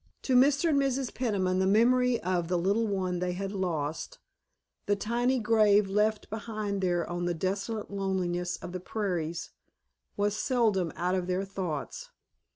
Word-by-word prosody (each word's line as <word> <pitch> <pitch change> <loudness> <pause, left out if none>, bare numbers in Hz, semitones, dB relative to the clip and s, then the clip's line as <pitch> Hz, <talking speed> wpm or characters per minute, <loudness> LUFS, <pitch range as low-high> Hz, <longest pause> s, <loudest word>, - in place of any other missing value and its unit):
To 260 - +1
Mr. 280 +5 +4
and 285 -3 +3
Mrs. 270 -2 0
Peniman 190 -7 0
the 190 - +2
memory 245 +4 +4
of 175 -1 -1
the 180 +1 +1
little 200 +6 +1
one 185 -3 -1
they 180 0 -1
had 195 +2 -4
lost, 175 - -3 0.7
the 205 - +3
tiny 240 +5 0
grave 210 -3 +4
left 210 +1 +1
behind 215 -2 -3
there 175 -2 0
on 175 0 -3
the 175 0 0
desolate 195 +5 -3
loneliness 185 -2 -1
of - - -8
the 185 - -4
prairies, 175 -5 -3 0.7
was 205 0 +1
seldom 215 - +1
out 180 +2 -1
of 185 -1 -1
their 185 +2 -1
thoughts. 185 -7 -5
195 Hz, 160 wpm, -29 LUFS, 180-225 Hz, 0.7 s, Mr